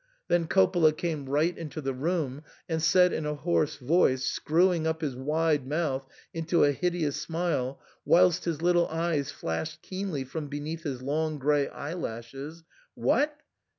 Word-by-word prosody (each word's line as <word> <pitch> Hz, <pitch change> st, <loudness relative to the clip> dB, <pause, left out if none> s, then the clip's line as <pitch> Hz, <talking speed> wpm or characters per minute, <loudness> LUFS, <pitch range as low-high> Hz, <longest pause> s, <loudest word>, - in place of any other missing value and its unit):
Then 175 Hz, -1 st, +2 dB
Coppola 175 Hz, -4 st, +4 dB
came 155 Hz, -6 st, -3 dB
right 155 Hz, +5 st, +2 dB
into 155 Hz, -1 st, -6 dB
the 135 Hz, -3 st, -2 dB
room, 145 Hz, -1 st, -2 dB, 0.3 s
and 160 Hz, -1 st, -1 dB
said 180 Hz, +2 st, +5 dB
in 150 Hz, -, -2 dB
a 150 Hz, -, -1 dB
hoarse 155 Hz, 0 st, 0 dB
voice, 130 Hz, -1 st, +2 dB
screwing 170 Hz, 0 st, +2 dB
up 160 Hz, +1 st, -1 dB
his 145 Hz, -5 st, -2 dB
wide 150 Hz, +1 st, 0 dB
mouth 140 Hz, -3 st, -1 dB, 0.3 s
into 165 Hz, +1 st, +2 dB
a 145 Hz, -, +5 dB
hideous 170 Hz, -1 st, -1 dB
smile, 165 Hz, -6 st, -2 dB, 0.2 s
whilst 180 Hz, -1 st, +4 dB
his 165 Hz, -2 st, -2 dB
little 175 Hz, -1 st, +4 dB
eyes 160 Hz, -3 st, -1 dB
flashed 155 Hz, -, -4 dB
keenly 185 Hz, -7 st, -3 dB
from 145 Hz, +3 st, -5 dB
beneath 150 Hz, +3 st, -5 dB
his 135 Hz, -6 st, -4 dB
long 155 Hz, +3 st, -1 dB
grey 145 Hz, 0 st, +2 dB
eyelashes, 140 Hz, 0 st, -6 dB, 0.2 s
" -, -, -35 dB
What 295 Hz, 0 st, +1 dB
155 Hz, 155 wpm, -28 LUFS, 145-170 Hz, 0.3 s, said